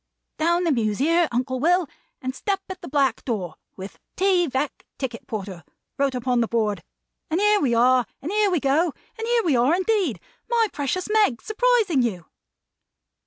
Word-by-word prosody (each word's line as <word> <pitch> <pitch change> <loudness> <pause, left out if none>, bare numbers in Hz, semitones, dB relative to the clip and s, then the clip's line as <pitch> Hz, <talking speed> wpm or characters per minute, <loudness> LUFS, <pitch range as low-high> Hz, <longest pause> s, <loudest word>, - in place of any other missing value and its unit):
"Down 340 +3 +2
the 335 - +2
Mews 215 -6 0
here, 335 +4 +3
Uncle 255 +2 -1
Will, 350 +3 +2 0.4
and 260 0 -2
step 390 +8 -2
at 375 - -8
the - - -8
black 270 -4 +1
door, 185 - -3 0.2
with 190 +1 -9 0.2
'T. 370 -2 +2
Veck, 270 +1 -3
Ticket 245 -4 -5
Porter,' 195 -5 -6 0.3
wrote 275 -2 0
upon 245 -1 +1
a - - -2
board; 210 -6 -1 0.5
and 325 +3 0
here 420 0 +4
we 250 -8 +1
are, 250 +1 +4
and 310 +7 -5
here 420 0 +3
we 355 -3 +1
go, 300 +5 +2 0.3
and 450 - -3
here 475 -1 +2
we 310 -6 +2
are 250 +7 +3
indeed, 375 - 0 0.3
my 460 -2 +2
precious 290 +6 -2
Meg, 420 - +2
surprising 435 - +2
you!" 190 -9 -2
280 Hz, 175 wpm, -23 LUFS, 240-370 Hz, 0.5 s, here